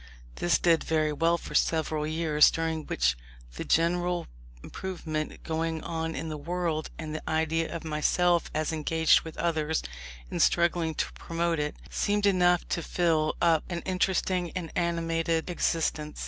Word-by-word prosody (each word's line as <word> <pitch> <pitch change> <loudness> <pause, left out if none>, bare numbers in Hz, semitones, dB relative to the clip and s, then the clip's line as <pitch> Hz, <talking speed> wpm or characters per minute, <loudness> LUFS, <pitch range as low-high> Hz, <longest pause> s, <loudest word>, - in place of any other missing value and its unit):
This 175 - +2
did 165 -2 +3
very 155 -1 +1
well 165 +3 +2
for - - -9
several 155 -1 +1
years, 155 -1 +4
during 160 -1 -2
which - - +1 0.4
the - - -5
general 175 +1 +1 0.4
improvement 160 -5 -5
going 160 0 -2
on 165 -1 -3
in 160 +4 -4
the 155 -1 -5
world 165 0 -2
and 155 -2 -5
the 155 - -5
idea 160 +1 0
of 170 - -5
myself 170 +3 +2
as 155 +1 -1
engaged 160 +1 +3
with 160 - -9
others 160 -2 0 0.5
in - - -3
struggling 170 -2 +2
to - - -2
promote 170 -1 -2
it, 150 0 -2 0.2
seemed 205 0 +1
enough 180 -3 +3
to 170 - -1
fill 160 -2 +1
up 165 -2 +4
an 175 -1 -3
interesting 185 -1 0
and 170 -4 -4
animated 165 0 0
existence. 155 -3 -1
165 Hz, 150 wpm, -28 LUFS, 155-170 Hz, 0.5 s, years